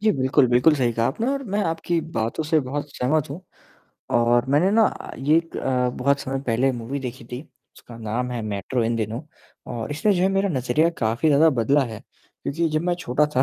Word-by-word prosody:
जी, 215 +1 +3
बिल्कुल, 130 0 +3
बिल्कुल 125 +6 +4
सही 125 -4 +1
कहा 115 0 +1
आपने 225 - -2
और 275 - -2
मैं 210 - +2
आपकी 165 +1 -1 0.2
बातों 115 +7 -1
से 155 +1 +2
बहुत 145 +3 -4
सहमत 150 +4 +1
हूँ। 160 - -6 0.8
और 120 +1 +3
मैंने 150 +8 +3
ना 220 +1 +1
ये 150 +4 +3
एक 165 0 -1
अ, 125 -1 0
बहुत 140 +3 0
समय 135 0 -3
पहले 125 +3 +2
मूवी 120 +4 -4
देखी 125 -2 -7
थी 125 +2 -7 0.4
उसका 120 - -13
नाम 115 +3 -3
है 120 - -3
मेट्रो 105 +4 -2
इन 115 +1 0
दिनों 110 +2 -3 0.5
और 115 +1 -5
इसने 205 +9 +2
जो 180 - +1
है 190 - +4
मेरा 195 +1 +1
नज़रिया 135 +1 +1
काफ़ी 115 +7 +1
ज़्यादा 150 +2 +5
बदला 135 +3 +2
है, 110 -3 -7 0.4
क्योंकि 165 +3 -1
जब 155 0 -1
मैं 175 0 +1
छोटा 150 -4 +1
था 130 - +5
135 Hz, 210 wpm, -23 LUFS, 120-160 Hz, 0.8 s, ज़्यादा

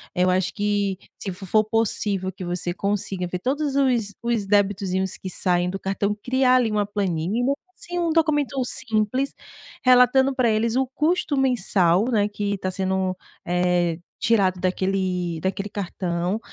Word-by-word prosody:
Eu 180 +1 +3
acho 185 0 +1
que 205 -2 0 0.2
se 195 - -4
fo 190 +2 -9
for 215 +4 +3
possível 205 -3 -1
que 185 0 -9
você 175 0 -3
consiga 195 -2 -2
ver 180 - -3
todos 280 +5 -1
os 245 -7 +1
os 235 -4 0
debitozinhos 195 -2 +1
que 185 - -6
saem 180 -1 +1
do 195 +1 -4
cartão, 200 +2 -1
criar 255 0 +3
ali 235 -4 +2
uma 210 -1 +1
planilha, 205 - 0 0.2
assim, 350 0 -5
um 340 -1 +1
documento 295 -4 +1
simples. 225 +4 -1 0.5
Relatando 255 +2 +5
para 250 -4 +2
eles, 225 +2 +1
o 265 0 +2
custo 305 +1 0
mensal, 210 -7 +2
né, 205 -2 +2
que 205 -1 -3
está 185 -1 -3
sendo, 190 0 -1 0.3
eh, 175 -1 +1 0.2
tirado 195 -5 +2
daquele 185 -2 -1
daquele 195 +2 -2
cartão, 180 0 -2
205 Hz, 150 wpm, -23 LUFS, 185-245 Hz, 0.5 s, Relatando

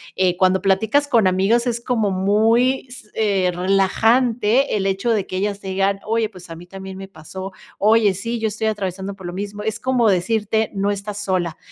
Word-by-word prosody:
Eh, 185 -1 +2
cuando 185 0 +3
platicas 220 +9 +2
con 225 -8 +3
amigas, 205 +7 +2
es 235 -1 -1
como 225 -5 0
muy 225 +8 +2
s 235 -4 -12
eh, 195 -4 +1
relajante 225 +7 +2
el 195 - -2
hecho 195 +5 0
de 210 -4 0
que 185 - -4
ellas 200 +1 -2
te 195 - -10
digan: 195 +1 0
"Oye, 225 0 +1
pues 185 -4 -14
a 165 - -7
mí 175 +2 -12
también 190 +1 -9
me 195 0 -8
pasó, 190 +3 -9 0.3
oye, 210 -1 +3
sí, 230 +4 -3
yo 220 - 0
estoy 220 +1 -3
atravesando 195 -2 -3
por 190 -3 -9
lo 175 - -6
mismo", 205 +2 -5
es 220 +1 -3
como 250 -4 +2
decirte: 215 +3 0
"No 200 +1 0
estás 205 +1 -4
sola", 175 -4 -1
200 Hz, 200 wpm, -20 LUFS, 190-225 Hz, 0.3 s, cuando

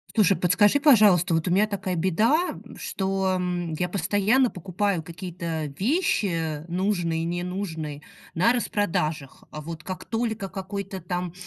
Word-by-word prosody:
Слушай, 200 -3 +4
подскажи, 205 +9 +4
пожалуйста, 205 - +5
вот 165 +2 -1
у - - +1
меня 205 +4 +4
такая 190 -3 -3
беда, 220 - +1 0.2
что, 190 -1 -1
м, 175 -2 -2
я 180 +3 -1
постоянно 205 +8 +2
покупаю 185 -1 -2
какие-то 170 -1 -5
вещи, 185 - 0
нужные, 175 -3 0
ненужные, 170 -4 -4 0.3
на 180 +8 +3
распродажах, 165 - -1
а 155 - -7
вот 160 0 -7
как 185 -1 -6
только 225 -3 -2
какой-то 195 0 -5
там 180 0 -4
185 Hz, 130 wpm, -25 LUFS, 170-205 Hz, 0.3 s, пожалуйста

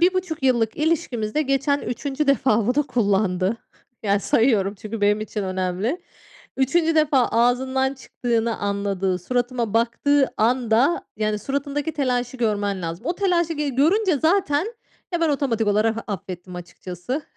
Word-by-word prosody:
1,5 360 -3 +1
yıllık 235 -4 +2
ilişkimizde 295 -5 0
geçen 275 +1 +1
3'üncü 280 +4 -3
defa 240 -6 +3
bunu 270 +4 +1
kullandı. 200 -3 +1 0.5
Yani 200 -1 +2
sayıyorum 210 -4 +2
çünkü 215 +2 -7
benim 205 +1 +3
için 215 -1 -4
önemli. 190 - -2 0.5
3'üncü 320 +5 +2
defa 290 -5 +3
ağzından 260 +3 +2
çıktığını 235 -3 -2
anladığı, 200 -2 -1
suratıma 240 +2 -2
baktığı 265 +5 +2
anda, 240 +6 +2
yani 215 0 0
suratındaki 280 +5 -2
telaşı 250 -4 -1
görmen 205 -5 -1
lazım. 170 +8 -5
O 345 - 0
telaşı, 345 -4 +1
g 300 -2 -2
görünce 330 - +2
zaten, 320 0 +2 0.5
ya, 345 - 0
ben 330 - +3
otomatik 265 -7 0
olarak 215 +2 +2
affettim 180 -2 -6
açıkçası. 180 - -6
245 Hz, 130 wpm, -23 LUFS, 210-285 Hz, 0.5 s, defa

